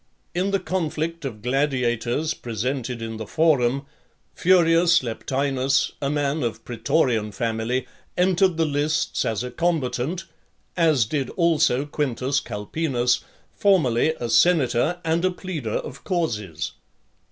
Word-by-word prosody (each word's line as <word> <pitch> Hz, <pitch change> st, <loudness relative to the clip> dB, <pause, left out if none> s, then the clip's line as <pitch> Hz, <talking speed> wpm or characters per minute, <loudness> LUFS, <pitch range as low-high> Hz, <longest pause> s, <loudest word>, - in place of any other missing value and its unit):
In 185 Hz, +3 st, 0 dB
the 195 Hz, 0 st, +1 dB
conflict 165 Hz, -3 st, -2 dB
of 110 Hz, -6 st, -6 dB
gladiators 125 Hz, +2 st, 0 dB
presented 120 Hz, +1 st, -3 dB
in 115 Hz, -1 st, -5 dB
the 110 Hz, -2 st, -6 dB
Forum, 140 Hz, -3 st, +2 dB, 0.5 s
Furius 170 Hz, -2 st, +4 dB
Leptinus, 135 Hz, +3 st, 0 dB
a 140 Hz, -, 0 dB
man 145 Hz, +1 st, 0 dB
of 120 Hz, -3 st, -3 dB
praetorian 115 Hz, -2 st, 0 dB
family, 115 Hz, +4 st, -1 dB, 0.3 s
entered 185 Hz, -1 st, +3 dB
the 165 Hz, -, +2 dB
lists 150 Hz, +2 st, 0 dB
as 110 Hz, 0 st, -1 dB
a 125 Hz, -, -5 dB
combatant, 160 Hz, +2 st, -1 dB, 0.5 s
as 155 Hz, -9 st, +3 dB
did 135 Hz, +2 st, -2 dB
also 160 Hz, -6 st, +2 dB
Quintus 140 Hz, -2 st, -1 dB
Calpenus, 125 Hz, +3 st, -1 dB, 0.4 s
formerly 160 Hz, -, +3 dB
a 120 Hz, -, -2 dB
senator, 135 Hz, +4 st, +3 dB
and 165 Hz, +2 st, +1 dB
a 185 Hz, -, +4 dB
pleader 180 Hz, -, -5 dB
of 125 Hz, +4 st, -4 dB
causes. 105 Hz, -, -2 dB
140 Hz, 120 wpm, -23 LUFS, 120-165 Hz, 0.5 s, Furius